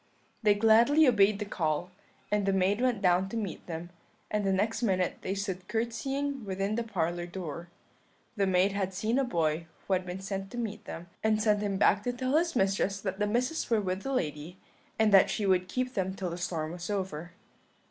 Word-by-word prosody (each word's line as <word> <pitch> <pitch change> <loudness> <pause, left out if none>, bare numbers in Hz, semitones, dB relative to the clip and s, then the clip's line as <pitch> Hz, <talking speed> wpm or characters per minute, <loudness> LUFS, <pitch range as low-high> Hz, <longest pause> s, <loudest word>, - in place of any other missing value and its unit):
"They 210 -2 +4
gladly 230 +8 +5
obeyed 210 -4 +4
the 210 - -3
call, 170 -2 -1 0.4
the 205 -1 +2
maid 195 +3 +2
went 245 -5 +1
down 180 +1 +3
to 230 - -4
meet 205 -5 -4
them, 170 +1 -6 0.4
and 210 -1 0
the 195 - +1
next 215 +4 0
minute 185 -5 0
they 190 - -2
stood 190 -2 -4
curtseying 270 +5 -2
within 195 +1 -2
the 235 - 0
parlour 175 -5 -2
door. 170 -2 -6 0.7
The 200 -3 +1
maid 190 +1 +3
had 190 -1 -2
seen 220 +6 +1
a - - +3
boy 165 -8 0 0.2
who 195 - 0
had 185 0 0
been 180 +1 -5
sent 195 0 -4
to 240 - -8
meet 220 -3 -4
them, 165 - -7 0.2
and 215 -1 +3
sent 210 -1 +2
him 200 -2 -1
back 200 0 +4
to 245 - 0
tell 255 +3 -1
his 335 0 +2
mistress 195 -1 +1
that 190 -1 -4
the 210 - +1
Misses 250 +9 -1
were 225 -2 +3
with 190 -1 -2
the 270 - -4
lady, 160 - -3 0.4
and 220 -1 +3
that 195 - +7
she 210 - -1
would 185 -1 +2
keep 255 0 -2
them 190 -1 -1
till 185 -3 -3
the 170 - -5
storm 165 -3 -2
was 175 +2 -6
over. 180 -4 -3
195 Hz, 210 wpm, -29 LUFS, 185-220 Hz, 0.7 s, that